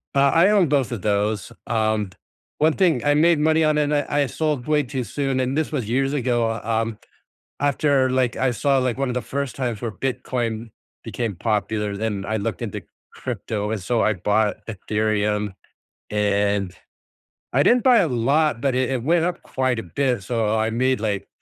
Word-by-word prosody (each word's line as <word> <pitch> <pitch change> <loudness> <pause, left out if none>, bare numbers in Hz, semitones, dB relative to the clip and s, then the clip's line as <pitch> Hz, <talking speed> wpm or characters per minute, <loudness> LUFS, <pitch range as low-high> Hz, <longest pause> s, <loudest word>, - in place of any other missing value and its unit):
Uh, - - +4
I 170 +4 +5
own 200 -5 +4
both 135 -4 +1
of 115 -5 -4
those. 105 +1 0 0.2
Um, 110 -3 0 0.5
one 155 +1 +3
thing 165 -9 +2
I 145 - +4
made 160 +2 +4
money 160 +1 +3
on, 155 -1 +2
and 150 0 +1
I 145 - +1 0.2
I - - 0
sold 150 -2 -2
way 150 -1 +2
too 130 -1 -4
soon, 135 +3 -2
and 130 +1 0
this 155 0 -1
was 130 -8 -2
years 135 +4 0
ago 120 -4 +1
um, 115 0 -1 0.6
after, 140 -1 +2
like, 130 -2 +1
I 130 -1 +1
saw, 135 +3 +2
like, 125 -3 0
one 135 0 -1
of 125 - -2
the 125 - -1
first 140 -2 -4
times 120 -5 -2
where 115 - -2
Bitcoin 120 -2 -3 0.3
became 115 -4 -3
popular, 105 0 -1
then 105 -2 -2
I 110 - -1
looked 115 +3 -3
into 110 -4 -4 0.3
crypto, 105 -1 -4
and 110 -2 -2
so 115 +5 +1
I 110 - +2
bought 105 +3 +1
Ethereum, 105 -1 -1 0.6
and, 100 -2 0 0.8
I 140 - +4
didn't 245 -1 +4
buy 250 -2 +6
a - - +3
lot, 135 +2 +1
but 135 -3 +1
it 130 -1 +1
it 125 -3 -2
went 165 +4 +2
up 180 0 -3
quite 130 -3 -1
a - - -5
bit, 125 - -1
so 115 +1 -1
I 110 0 +1
I - - -1
made, 130 +2 +1
like, 105 -2 -2
120 Hz, 195 wpm, -22 LUFS, 110-140 Hz, 0.8 s, buy